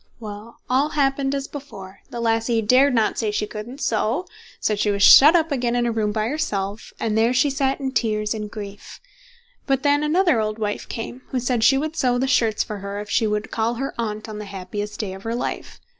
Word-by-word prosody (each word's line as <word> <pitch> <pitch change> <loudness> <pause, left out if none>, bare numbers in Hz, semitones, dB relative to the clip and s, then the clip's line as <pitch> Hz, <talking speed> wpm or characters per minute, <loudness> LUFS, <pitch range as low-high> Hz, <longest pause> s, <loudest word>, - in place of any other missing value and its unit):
Well, 215 +1 -9
all 270 +4 +2
happened 275 -2 0
as 275 -1 -3
before; 200 -10 -10
the 240 - -6
lassie 225 0 +1
dared 255 +5 +4
not 220 -2 +1
say 220 - 0
she 210 0 -1
couldn't 220 +6 -8
sew; 230 - 0 0.3
so 215 - +1
she 210 +1 0
was 200 0 +1
shut 300 +5 +9
up 325 -2 +2
again 245 -3 0
in 240 0 +1
a 235 - +1
room 215 -2 0
by 215 0 -1
herself, 215 -8 -3
and 220 -2 -1
there 230 +3 +3
she 275 +3 +3
sat 270 0 0
in 265 -1 -2
tears 215 -4 0
and 210 -1 -5
grief. 205 -1 -9 0.7
But 270 -1 +1
then 290 0 +3
another 315 - +2
old 215 0 -2
wife 210 -2 -3
came, 240 +2 -6
who 260 - -2
said 245 -2 0
she 270 +3 +5
would 310 +3 -3
sew 250 -5 +1
the 255 - +1
shirts 230 -5 +2
for 210 -1 -6
her 200 +1 -5
if 210 0 -7
she 225 - +2
would 210 +1 -2
call 230 +1 0
her 270 +3 -3
Aunt 215 -1 -3
on 215 -1 -7
the 210 - -6
happiest 200 +2 -6
day 200 -4 -3
of 190 - -9
her 230 +3 -3
life. 245 - -4
230 Hz, 225 wpm, -22 LUFS, 210-270 Hz, 0.7 s, shut